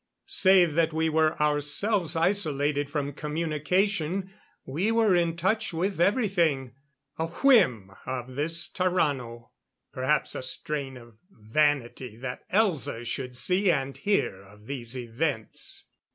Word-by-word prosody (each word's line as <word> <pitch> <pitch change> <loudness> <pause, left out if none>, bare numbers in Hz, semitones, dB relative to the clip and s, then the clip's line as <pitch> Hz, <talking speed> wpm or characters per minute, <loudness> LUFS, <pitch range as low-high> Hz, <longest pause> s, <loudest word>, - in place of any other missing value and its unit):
Save 190 - +4
that 165 0 +1
we 160 0 +1
were 155 0 +1
ourselves 150 +5 +1
isolated 150 -5 0
from 145 -1 -3
communication, 170 +5 -1 0.3
we 175 +11 -1
were 225 -4 +3
in 170 -1 +1
touch 190 +3 0
with 180 +2 -1
everything. 175 - +1 0.5
A 160 - 0
whim 165 - +3 0.2
of 130 0 -4
this 160 +5 0
Tarrano; 140 -11 -1 0.4
perhaps 130 +4 0
a - - -4
strain 135 +1 -3
of 120 -2 -15
vanity 125 - -1
that 125 +1 -7
Elza 165 - 0
should 125 +1 -3
see 185 +8 +2
and 135 -4 0
hear 200 - 0
of 105 +2 -18
these 125 -1 -5
events. 120 0 -3
150 Hz, 125 wpm, -27 LUFS, 130-180 Hz, 0.5 s, Save